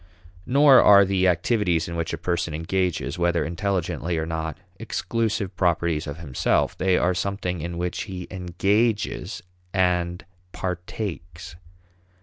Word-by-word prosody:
Nor 140 +1 +7
are 100 -1 +7
the 95 -1 +2
activities 90 -1 +1
in 85 - -5
which 85 -1 -2
a 80 - -3
person 85 -2 -2
engages, 90 +2 -1
whether 85 -1 +1
intelligently 90 -1 -2
or 80 - -1
not, 80 -1 -4 0.2
exclusive 100 +1 -2
properties 85 -3 0
of 70 +1 -5
himself; 70 -7 0
they 95 -1 +2
are 90 +1 +2
something 90 -2 -2
in 85 +1 -5
which 90 0 -3
he 95 -4 -6
engages 100 +5 -1 0.3
and 90 -1 +1 0.3
partakes. 90 -2 -5
90 Hz, 130 wpm, -24 LUFS, 85-95 Hz, 0.3 s, Nor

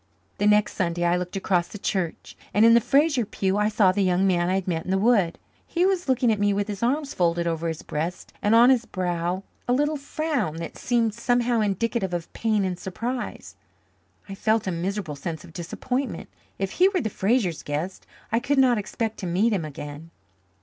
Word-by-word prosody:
The 205 - +3
next 210 0 +4
Sunday 175 -2 -1
I 175 0 +3
looked 180 +1 -4
across 185 -3 +1
the - - -9
church, 190 -4 -3 0.2
and 210 +2 +6
in 230 - +7
the 235 - +6
Fraser 280 +2 +3
pew 195 -1 -1
I 210 +1 +2
saw 205 -3 +4
the 200 +2 0
young 185 0 +2
man 175 -2 +2
I 185 - +2
had 190 -1 -2
met 165 -3 -1
in - - -8
the 190 - +2
wood. 200 -5 +3 0.3
He 350 +1 +1
was 375 -5 0
looking 250 -2 +3
at 215 - 0
me 205 0 +2
with 200 +1 -1
his 205 -2 -5
arms 280 +4 0
folded 170 -1 +1
over 165 0 -1
his 160 -1 -4
breast 165 +4 -4
and 210 +2 +3
on 240 +3 +7
his 240 -3 +2
brow 180 0 -2 0.2
a 245 - +3
little 295 +3 +1
frown 285 - -2
that 165 0 -6
seemed 235 -3 +1
somehow 240 0 +1
indicative 205 -2 -1
of 170 -2 -6
pain 215 -3 +1
and 180 -1 -3
surprise. 240 +6 -5 0.7
I 195 - -7
felt 220 +2 +1
a 190 - -1
miserable 175 -2 -3
sense 160 +3 -5
of 170 -3 -14
disappointment. 250 - -4 0.3
If 195 -1 -2
he 370 +2 +4
were 385 -2 0
the 220 - -3
Frasers' 195 - 0
guest 155 +6 -4 0.2
I 230 - +3
could 275 +4 0
not 250 -4 +4
expect 220 +2 -3
to 185 - -4
meet 200 +7 +2
him 180 -6 -1
again. 145 +2 -8
200 Hz, 210 wpm, -25 LUFS, 175-235 Hz, 0.7 s, in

